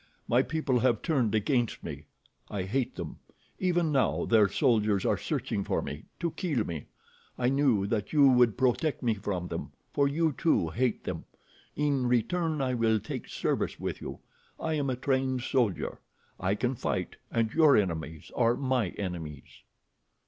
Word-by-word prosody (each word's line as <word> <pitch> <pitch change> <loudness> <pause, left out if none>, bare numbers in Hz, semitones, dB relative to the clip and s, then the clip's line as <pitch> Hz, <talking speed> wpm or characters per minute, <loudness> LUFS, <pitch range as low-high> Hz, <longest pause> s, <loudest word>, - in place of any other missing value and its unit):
My 120 +2 +4
people 140 -4 0
have 120 -2 +2
turned 125 -9 +1
against 120 +2 0
me. - - -7 0.4
I 100 -3 -2
hate 125 +6 -1
them. 85 -4 -6 0.4
Even 175 -3 +1
now 135 -3 +2
their 110 -3 +5
soldiers 105 -4 +2
are - - +3
searching 100 - -2
for - - 0
me, 75 - -6
to 170 -2 -1
kill 145 - -1
me. 80 -4 -5 0.5
I 125 0 +2
knew 135 -7 +3
that 105 0 -2
you 145 -3 +6
would 125 -4 +4
protect 130 +4 +1
me 115 -2 +3
from 95 -4 -3
them, - - -5 0.2
for 140 -1 +3
you, 160 +3 +1
too, 135 - +1
hate 120 +6 0
them. - - -4 0.5
In 140 -3 +1
return 155 +6 +1
I 130 -1 0
will 115 -2 +2
take - - -6
service - - -1
with - - -4
you. - - -6 0.4
I 160 - -1
am 145 -3 0
a 130 - 0
trained 130 -1 0
soldier. 120 -9 0 0.4
I 95 +2 +1
can 125 +4 0
fight, 120 - -3
and 115 -1 0
your 155 -3 +6
enemies 80 -6 -2
are 120 -1 +3
my 130 -7 0
enemies." 80 -8 -6
125 Hz, 165 wpm, -29 LUFS, 105-140 Hz, 0.5 s, you